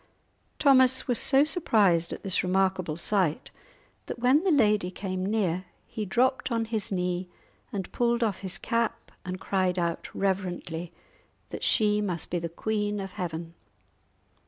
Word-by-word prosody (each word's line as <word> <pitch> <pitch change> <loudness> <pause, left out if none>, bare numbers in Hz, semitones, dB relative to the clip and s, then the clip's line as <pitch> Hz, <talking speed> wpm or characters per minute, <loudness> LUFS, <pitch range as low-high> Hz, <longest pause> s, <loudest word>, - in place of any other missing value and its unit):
Thomas 260 -2 +4
was 245 -3 +2
so 270 +1 +4
surprised 205 - +2
at - - -6
this 190 -2 +1
remarkable 185 -3 0
sight 180 -4 0 0.6
that - - -5
when 255 +7 +3
the 390 - +2
lady 210 - +3
came 185 0 -4
near 190 -3 0 0.2
he 215 - -5
dropped 255 +6 +1
on 230 -1 0
his 220 -2 -2
knee 180 -1 -2 0.4
and 195 -3 -4
pulled 235 0 +1
off 210 -4 -1
his 190 -2 -3
cap, 230 -1 -2
and 185 0 -5
cried 185 -2 0
out, 170 -1 -2
reverently, 180 -3 -2 0.6
that - - -7
she 210 -2 +3
must 180 -5 -3
be 175 - 0
the 170 0 -4
Queen 210 +3 -2
of 195 -1 -5
Heaven. 170 -2 -5
195 Hz, 150 wpm, -27 LUFS, 180-230 Hz, 0.6 s, Thomas